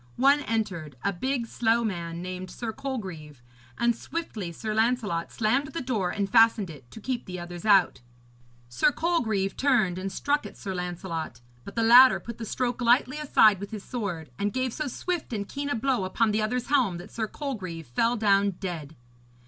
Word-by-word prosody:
One 275 +3 +5
entered, 200 - -3
a 200 - +1
big 255 +6 -1
slow 230 0 +1
man, 170 -5 -3
named 185 0 -6
Sir 230 -2 -5
Colgreve, 180 - -6 0.3
and 235 0 +2
swiftly 230 - -5
Sir 215 +6 -4
Lancelot 220 -6 0
slammed 255 +6 +1
the 330 - -2
door 225 -8 -1
and 200 +2 -1
fastened 220 -3 +4
it, 135 -5 -14
to - - -11
keep 245 +2 -3
the 180 -1 -5
others 175 +1 -8
out. 195 - +4 0.7
Sir 120 - +2
Colgreve 220 - 0
turned 220 -10 +2
and 195 +1 -4
struck 290 +8 0
at - - -14
Sir 195 - -5
Lancelot; 175 -4 -5 0.2
but 200 - -10
the 230 - +1
latter 245 +3 +8
put 235 0 -9
the 225 - -4
stroke 245 +2 -2
lightly 250 +4 +3
aside 215 -9 +5
with 200 0 -6
his 210 -3 -7
sword, 180 - -4
and 205 +1 0
gave 255 -2 -1
so 305 - -3
swift 340 +1 -3
and 200 -2 -3
keen 285 +4 -4
a 285 - 0
blow 245 -2 0
upon 215 +4 +1
the 215 +1 +1
other's 250 +4 -2
helm 245 -11 +2
that 175 +4 -10
Sir 220 -1 -2
Colgreve 190 - -5
fell 230 - +1
down 200 -2 +3
dead. 160 -5 -5
215 Hz, 190 wpm, -27 LUFS, 180-250 Hz, 0.7 s, latter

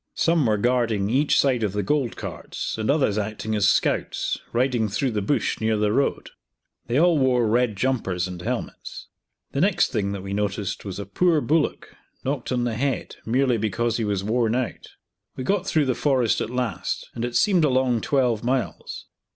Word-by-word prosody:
Some 165 -6 +2
were 105 -1 +2
guarding 115 -3 +1
each 145 +4 +3
side 130 -4 +2
of 105 -3 -1
the 105 0 -1
gold 135 +2 0
carts, - - -5
and 110 - -1
others 135 -8 +2
acting 110 +1 -3
as 100 -3 +3
scouts, - - 0
riding 120 -3 +1
through 125 +6 -1
the 105 -2 -1
bush 125 +4 0
near 110 0 +1
the 105 0 +1
road. 140 +3 0 0.6
They 120 +2 0
all 170 -2 +4
wore 125 -3 +3
red 115 0 +2
jumpers 95 -7 0
and 90 -1 -7
helmets, - - -5 0.4
The 140 - -1
next 195 +1 +2
thing 100 -4 -1
that 100 -2 -6
we 100 0 -5
noticed 105 -1 -2
was 95 -2 -5
a 100 - -5
poor 165 - +2
bullock, 155 +1 -1 0.3
knocked 135 -2 -3
on 125 -1 +1
the 120 -1 -1
head, 135 +4 -2
merely 125 +1 +2
because 110 +2 -1
he 115 - -1
was 100 -2 -1
worn 115 +1 +1
out. 125 -2 -3 0.5
We 130 - -5
got 195 +6 0
through 155 -2 +2
the 130 - +1
forest 130 -4 +1
at - - -2
last, 125 -6 -3
and 115 - -4
it 120 0 -3
seemed 190 -6 +3
a 150 - +4
long 130 -3 +2
twelve 125 -5 +1
miles. 125 +1 -2
120 Hz, 190 wpm, -24 LUFS, 105-135 Hz, 0.6 s, all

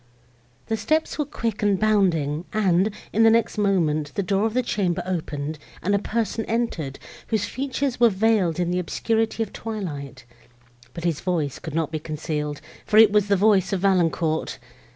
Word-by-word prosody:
The 225 - -1
steps 310 +10 0
were 295 - +1
quick 230 -6 -3
and 205 -2 +2
bounding, 175 -8 +1
and, 195 -2 +3 0.2
in 220 - +2
the 225 - +7
next 225 -1 +2
moment, 155 -7 +1
the 200 - 0
door 195 +3 +1
of 225 - -6
the 255 - +2
chamber 185 -6 -1
opened, 155 -4 -3 0.2
and 200 - +1
a 200 - +3
person 225 +1 -2
entered, 220 - -2 0.3
whose 220 -3 0
features 270 -1 -2
were 240 -1 +6
veiled 195 -4 +1
in 175 -1 0
the 180 - 0
obscurity 225 +5 0
of 215 - -9
twilight; 145 - -6 0.7
but 170 - -6
his 170 -4 0
voice 160 -7 -1
could 160 -3 -7
not 160 -2 0
be 155 - -2
concealed, 150 -1 -4 0.2
for 215 - +1
it 220 -2 +8
was 210 -1 +3
the 200 - +3
voice 195 -1 +3
of 190 - -1
Valancourt! 170 -4 +1
195 Hz, 175 wpm, -24 LUFS, 160-220 Hz, 0.7 s, it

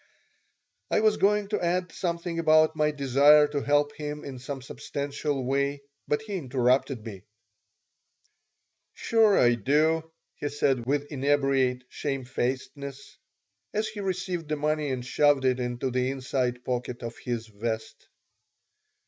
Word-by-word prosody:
I - - +2
was 215 -1 +3
going 205 0 +2
to 210 -4 -1
add 180 0 0
something 170 -1 -3
about 155 -1 +4
my 150 -1 +2
desire 145 +1 +5
to 145 -1 -2
help 145 +1 +2
him 150 0 -6
in 130 -2 -7
some 135 +1 -6
substantial 140 0 -3
way, 140 +2 0 0.2
but 150 - 0
he 205 -3 -4
interrupted 130 -4 +1
me 100 -4 -8 1.7
"Sure, 220 -3 +3
I 120 -1 +5
do," 155 +7 +1 0.3
he 145 - -3
said, 135 -4 0
with 145 +1 +1
inebriate 135 -2 +1
shamefacedness, 135 +1 -4 0.6
as 215 +1 +1
he 215 -1 -8
received 180 -3 -3
the 155 - +1
money 150 0 0
and 125 -2 -3
shoved 145 0 +3
it 130 -1 +2
into 125 +1 -2
the 125 +1 0
inside 125 -2 -2
pocket 125 -1 -3
of 115 0 -6
his 120 -2 -3
vest. 110 +1 -5
140 Hz, 135 wpm, -27 LUFS, 125-155 Hz, 1.7 s, desire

